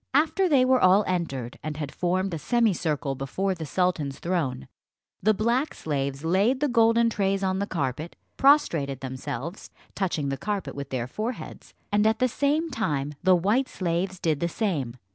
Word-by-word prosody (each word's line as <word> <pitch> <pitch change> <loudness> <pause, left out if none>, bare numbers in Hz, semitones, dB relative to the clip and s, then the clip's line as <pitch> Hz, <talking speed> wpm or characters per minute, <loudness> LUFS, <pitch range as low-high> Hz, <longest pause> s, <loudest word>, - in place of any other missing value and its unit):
After 320 +6 +3
they 270 -4 +5
were 255 -1 +3
all 190 +3 +6
entered, 140 -10 -3
and 155 -1 -5
had 145 -3 -4
formed 185 +1 -1
a 165 - -3
semicircle 170 - +1
before 135 +9 -2
the 165 -4 -6
sultan's 165 -6 0
throne, 160 - -2 0.5
the 215 - +4
black 240 +8 0
slaves 140 -1 -3
laid 200 +10 +2
the 295 - +2
golden 230 -1 +4
trays 195 -3 0
on 190 0 0
the 200 - -1
carpet, 155 -2 -3 0.2
prostrated 165 - +3
themselves, 130 - -6 0.2
touching 170 -7 -1
the 135 - -2
carpet 205 +2 -3
with 140 -1 -6
their 125 -3 -2
foreheads, 220 - -6 0.2
and 210 +1 +3
at 220 0 +2
the 255 - +2
same 295 +6 0
time 150 - -1
the 185 0 +5
white 210 +10 +1
slaves 185 +1 -2
did 155 -3 0
the 170 - 0
same. 155 - -2
185 Hz, 170 wpm, -26 LUFS, 145-225 Hz, 0.5 s, all